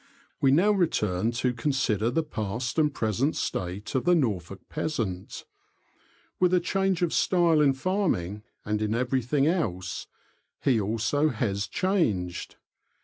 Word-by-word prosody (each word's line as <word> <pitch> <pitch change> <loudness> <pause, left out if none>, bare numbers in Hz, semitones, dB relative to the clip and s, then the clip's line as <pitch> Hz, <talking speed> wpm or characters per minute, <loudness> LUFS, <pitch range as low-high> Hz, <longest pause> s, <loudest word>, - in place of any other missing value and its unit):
We 135 - +5
now 175 +10 +4
return 110 - +1
to 125 +1 0
consider 120 -4 0
the 160 +7 0
past 120 0 -3
and 150 -1 +3
present 120 +4 0
state 95 +4 -3
of 130 - +1
the 175 +1 +4
Norfolk 100 - -1
peasant. 115 -13 -4 0.9
With 180 0 +4
a - - +4
change 190 0 0
of 170 - 0
style 170 -4 +3
in 140 -2 +4
farming, 135 - -1 0.2
and 105 0 -1
in 110 +1 0
everything 130 +3 +1
else, 95 - -1 0.6
he 125 -6 +3
also 115 +9 +1
has 105 -4 -1
changed. 110 - -1
125 Hz, 135 wpm, -27 LUFS, 105-160 Hz, 0.9 s, We